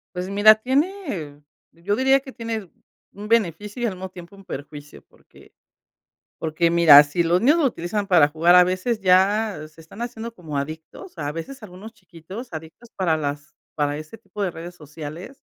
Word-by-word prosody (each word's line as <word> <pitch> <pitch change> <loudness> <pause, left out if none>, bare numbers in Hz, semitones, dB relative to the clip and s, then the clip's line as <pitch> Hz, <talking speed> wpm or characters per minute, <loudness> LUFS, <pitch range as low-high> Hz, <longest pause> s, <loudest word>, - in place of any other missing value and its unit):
Pues 180 +1 -4
mira, 205 +2 +7
tiene 255 - -2 0.3
yo 175 +5 -2
diría 265 +2 +3
que 270 -1 -12
tiene 225 -6 -5 0.4
un 205 +1 -9
beneficio 210 0 0
y - - +2
al 220 - -2
mismo 185 +1 -7
tiempo 180 +1 -13
un 195 - -16
perjuicio, 145 -3 -9
porque - - -22 0.9
porque 165 +1 0
mira, 165 -4 +8
si 145 +4 -1
los 170 +2 +2
niños 290 +8 +4
lo 325 - +2
utilizan 205 -2 -3
para 165 -6 +5
jugar, 165 +3 +3
a 180 0 +8
veces 185 +6 -2
ya 190 -2 +2
se 155 +1 -19
están 165 +8 -10
haciendo 235 -1 -6
como 155 -7 -6
adictos, 160 - -8
a 145 -1 -4
veces 220 - -8
algunos 200 +3 -11
chiquitos 185 +3 -11
adictos 160 +9 -10
para 170 -4 +1
las 145 -1 -5 0.2
para 145 -1 -1
ese 155 +8 -10
tipo 210 -2 -8
de 190 - 0
redes 170 +2 -9
sociales. 155 - -10
180 Hz, 175 wpm, -22 LUFS, 160-220 Hz, 0.9 s, mira